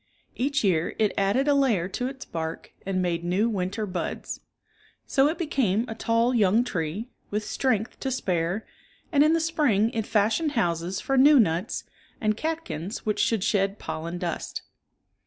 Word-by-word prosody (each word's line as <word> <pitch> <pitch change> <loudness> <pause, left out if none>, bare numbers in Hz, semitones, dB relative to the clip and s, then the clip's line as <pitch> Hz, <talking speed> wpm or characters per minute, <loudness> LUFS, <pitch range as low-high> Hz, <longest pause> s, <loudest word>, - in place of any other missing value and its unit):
Each 280 +1 0
year 175 -5 +1
it 215 -2 +2
added 200 +8 +2
a 290 - +5
layer 240 -11 +2
to 250 +6 -2
its 265 0 -7
bark 160 0 -5 0.2
and 185 -1 0
made 170 -1 -1
new 185 +6 +1
winter 200 0 -2
buds. 180 -4 -4 0.7
So 270 +1 +3
it 315 - -1
became 245 - +1
a 225 - -4
tall 230 +2 +1
young 220 0 +4
tree, 200 +2 -3 0.2
with 210 +1 -2
strength 225 -3 -1
to 270 - -2
spare, 185 -5 -1 0.5
and 290 -2 +5
in 310 +1 +4
the 330 - +3
spring 285 -10 +2
it 225 -3 -2
fashioned 225 +9 +2
houses 175 - 0
for 270 +3 0
new 285 +1 +7
nuts, 180 0 +1 0.4
and 215 -2 +1
catkins 310 - -4
which 210 -1 0
should 225 -5 +2
shed 200 -1 +1
pollen 160 +1 -5
dust. 175 -2 -4
215 Hz, 165 wpm, -26 LUFS, 185-260 Hz, 0.7 s, new